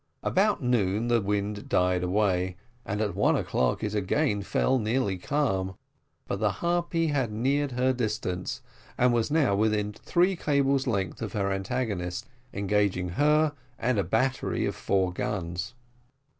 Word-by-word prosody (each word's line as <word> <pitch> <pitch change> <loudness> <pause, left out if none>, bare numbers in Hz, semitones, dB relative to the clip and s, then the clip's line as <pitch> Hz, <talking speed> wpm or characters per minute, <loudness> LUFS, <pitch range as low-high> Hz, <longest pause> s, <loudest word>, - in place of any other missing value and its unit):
About 200 -4 +2
noon 115 -2 +1
the 120 -1 +3
wind 105 +1 -2
died 90 0 +2
away, 90 -1 +1 0.3
and 105 +2 -2
at 105 -2 0
one - - +3
o'clock 65 -1 0
it 105 -1 -2
again 105 +3 +1
fell 130 +6 +1
nearly 110 -4 0
calm; 95 -8 -1 0.5
but 100 - -3
the 105 -2 +1
Harpy 170 - 0
had 135 -6 0
neared 135 +5 0
her 130 +1 +2
distance, 105 -6 -3 0.3
and 125 0 +4
was 115 +1 +1
now 145 -10 +3
within 105 0 +1
three 180 - +1
cables' 140 -4 +1
length 100 -4 -1
of 110 - -4
her 100 -2 0
antagonist, 95 -3 -2 0.2
engaging 100 -2 0
her 150 - +3 0.2
and 125 -4 +1
a - - +2
battery 125 +8 0
of - - -1
four 95 -2 0
guns. 90 +2 -3
105 Hz, 145 wpm, -27 LUFS, 95-130 Hz, 0.5 s, and